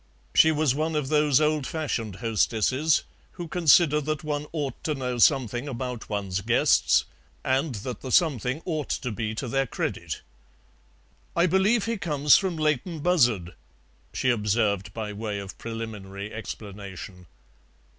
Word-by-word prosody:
She 160 - +6
was 150 -4 +2
one 155 +3 -1
of 145 -3 -1
those 150 -3 +4
old 150 -2 +1
fashioned 120 - -3
hostesses 115 +7 +1 0.3
who 175 -2 -6
consider 160 -2 +4
that 155 0 -3
one 150 -1 -3
ought 145 -6 -4
to 155 - -1
know 125 -2 -3
something 125 -1 +3
about 125 -2 -5
one's 100 -2 -2
guests, - - +3 0.4
and 135 +1 +1
that 125 -4 -5
the 130 - -6
something 135 - +2
ought 155 -5 -3
to 125 - -2
be 110 0 -3
to 125 - -4
their 135 +2 0
credit. - - -4 1.1
"I 170 - +4
believe 195 +5 +3
he 230 0 -1
comes 150 -5 +4
from 185 -4 +1
Leighton 155 +1 -1
Buzzard," 120 - +2 0.6
she 130 - +1
observed 105 -3 0
by 110 -2 -4
way 105 0 -4
of 100 -1 -7
preliminary 105 -3 -6
explanation. 100 -4 -8
130 Hz, 145 wpm, -26 LUFS, 110-155 Hz, 1.1 s, She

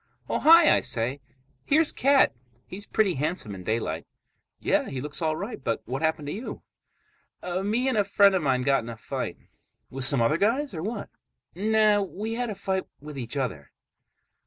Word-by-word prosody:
"Oh, - - -1
hi!" 330 0 +7
I - - +3
say. 125 +5 +1 0.4
"Here's 310 +2 +3
Cat. 275 +1 +4 0.3
He's 205 +3 -7
pretty 210 -4 +2
handsome 150 - -3
in 95 -1 -8
daylight." 90 -7 -2 0.5
"Yeah, - - +1
he 130 - -4
looks 150 +4 -4
all 155 -1 +1
right, 200 - -6
but 115 -2 -2
what 130 +5 -4
happened 160 -2 0
to - - -3
you?" 225 +6 -7 0.8
"Me 200 +8 -1
and 260 - +1
a 210 - +3
friend 200 0 +4
of 190 - +1
mine 130 -3 +1
got 135 +1 +2
in 115 - -8
a 115 - -7
fight." - - -5 0.5
"With 135 0 -3
some 135 +1 +4
other 115 +7 +2
guys 240 - +1
or 160 - -5
what?" 210 +4 -4 0.4
"Nah. 215 +2 +3
We 205 +3 -4
had 240 0 -2
a 210 - -4
fight 190 -1 -2
with 150 +1 -10
each 125 +1 -5
other." 110 - -4
180 Hz, 185 wpm, -26 LUFS, 130-215 Hz, 0.8 s, hi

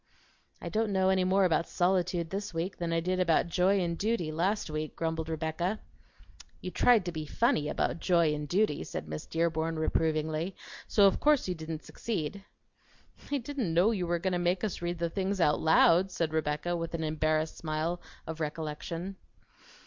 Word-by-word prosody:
"I - - -7
don't 220 -1 0
know 190 -1 +3
any 190 -1 +3
more 190 +1 +3
about 170 -1 +2
solitude 175 -2 +1
this 195 -2 -4
week 175 +4 -2
than 170 -1 -2
I 165 0 +1
did 185 +2 -1
about 170 -3 +3
joy 185 +3 +2
and 170 -2 -1
duty 205 -5 -1
last 185 +7 0
week," 155 0 -4
grumbled 160 -1 -2
Rebecca. 160 +6 -2 0.8
"You 185 - -6
tried 215 +3 +4
to 175 - -2
be 155 -2 -5
funny 155 - +1
about - - -1
joy 170 -4 +3
and 150 0 -4
duty," 190 - +1
said 80 - -6
Miss 75 0 -6
Dearborn 165 0 0
reprovingly; 160 +2 0 0.3
"so 205 - +5
of 195 - +4
course 295 -6 +3
you 180 - 0
didn't 160 -1 -6
succeed." 200 -3 -4 0.9
"I 285 - +2
didn't 245 - -3
know 185 +6 +5
you 185 -6 -1
were 175 0 +1
going 185 +2 -1
to 175 - +1
make 175 +1 0
us 210 -5 -2
read 175 0 -2
the 170 0 0
things 195 +1 -1
out 150 -4 +3
loud," 165 +3 +5
said 165 -4 -2
Rebecca 155 +2 -1
with 165 0 -3
an 160 - -3
embarrassed 155 0 0
smile 160 +2 -2 0.2
of 160 0 -6
recollection. 160 +4 -4
170 Hz, 185 wpm, -30 LUFS, 160-190 Hz, 0.9 s, so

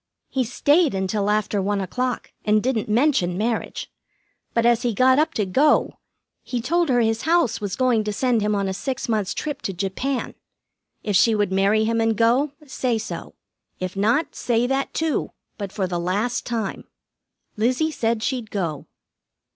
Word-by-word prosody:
"He 265 -1 0
stayed 285 - +2
until 200 +2 -1
after 210 -1 +1
one 200 +1 0
o'clock, 250 +7 -3
and 210 0 +2
didn't 235 -4 -1
mention 215 -7 +2
marriage. 225 +2 -2 0.6
But 230 0 +2
as 240 -1 +4
he 240 -3 -1
got 260 +4 +5
up 310 - +1
to 210 - +1
go 275 +11 +2 0.4
he 245 - -3
told 335 +7 +1
her 245 -2 +3
his 225 0 +1
house 330 -10 +2
was 200 -3 -3
going 250 -4 +2
to 210 - -1
send 240 +1 +1
him 210 0 +1
on 200 -1 0
a 190 - -2
six 260 +7 -3
months' 215 -4 -1
trip 295 -2 -4
to 195 - -3
Japan. 200 +9 -2 0.7
If 205 -2 -1
she 220 +3 +5
would 205 -2 0
marry 200 +3 +3
him 230 +1 +1
and 225 -1 +1
go, 250 +6 +3
say 255 -3 -1
so. 220 - -6 0.4
If 185 0 -4
not, 230 +10 +1
say 235 0 0
that, 270 +2 -1
too, 320 -2 -1 0.3
but 200 -2 -4
for 195 - -1
the 175 -1 -2
last 200 +8 -1
time. 225 -5 -3 0.7
Lizzie 255 +9 +1
said 225 -5 -1
she'd 245 -5 -2
go." 170 -9 -3
225 Hz, 175 wpm, -23 LUFS, 205-255 Hz, 0.7 s, got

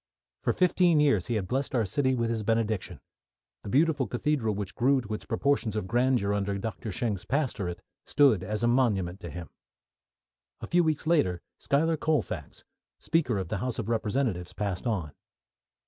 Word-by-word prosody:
For - - +1
fifteen 180 -3 +3
years 140 -12 +3
he 120 - -1
had 100 -4 -1
blessed 135 +3 -2
our 115 -3 +2
city 130 +6 +1
with 115 -1 0
his 115 -2 -1
benediction. 110 -2 -1 0.6
The - - -7
beautiful 145 +1 +2
cathedral 120 -4 0
which 100 -2 -5
grew 135 +6 +3
to 110 -3 -6
its 105 - -5
proportions 140 -6 0
of 105 -4 -2
grandeur 120 -2 +2
under 100 -1 -1
Doctor 110 +1 -5
Schenck's 105 -1 -2
pastorate, 115 - -2 0.2
stood 135 -10 +4
as 105 +3 -3
a - - +4
monument 105 -8 +1
to 85 - -7
him. 85 +1 -8 1.1
A - - -6
few 175 0 +3
weeks 155 -1 0
later 145 - +2 0.2
Schuyler 160 +3 +1
Colfax, 155 -1 -2 0.3
speaker 145 -10 0
of 95 -3 -3
the 105 - -1
House 125 +2 -2
of 115 -1 -3
Representatives, 110 -5 -1
passed 100 0 -3
on. 90 -10 -1
115 Hz, 170 wpm, -28 LUFS, 100-140 Hz, 1.1 s, stood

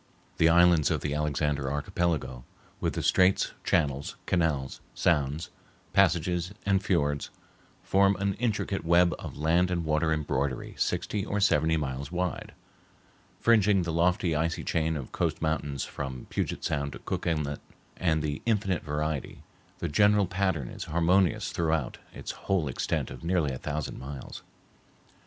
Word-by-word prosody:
The 80 - +5
islands 85 -2 +5
of - - 0
the 75 - -2
Alexander 75 -2 0
Archipelago, 75 -4 -1 0.4
with - - -1
the - - -3
straits, 95 +1 +3
channels, 70 -1 0
canals, 80 -7 0
sounds, 75 +4 +1 0.4
passages, 90 0 +2
and 100 -1 +2
fiords, 75 -6 0 0.5
form 100 +1 +3
an 100 0 0
intricate 105 -6 -1
web 85 +1 +4
of - - -7
land 85 +4 +2
and 85 -2 -1
water 80 +1 +1
embroidery 70 -4 -1
sixty 105 -2 -1
or 105 0 -2
seventy 80 -5 +3
miles 70 0 -4
wide, 90 0 -3 0.9
fringing 105 -4 +4
the 85 -1 -3
lofty 85 0 +2
icy 80 +2 -1
chain 80 -1 0
of 65 -4 -7
coast - - -1
mountains 75 -3 -1
from 65 -3 -6
Puget - - -2
Sound 70 -1 -1
to - - -7
Cook - - -3
Inlet; 75 -3 -1 0.4
and, 80 -4 +1
with 75 -1 -3
infinite 100 -5 +1
variety, 75 -1 -3 0.3
the 85 - -3
general 105 +5 +4
pattern 95 -7 -1
is - - -7
harmonious 85 +2 +2
throughout 80 -5 -1
its - - -6 0.2
whole 95 -6 +2
extent 65 - -2
of - - -9
nearly 85 -4 +1
a 65 - -6
thousand 75 -1 -4
miles. 70 0 -8
80 Hz, 145 wpm, -28 LUFS, 75-90 Hz, 0.9 s, The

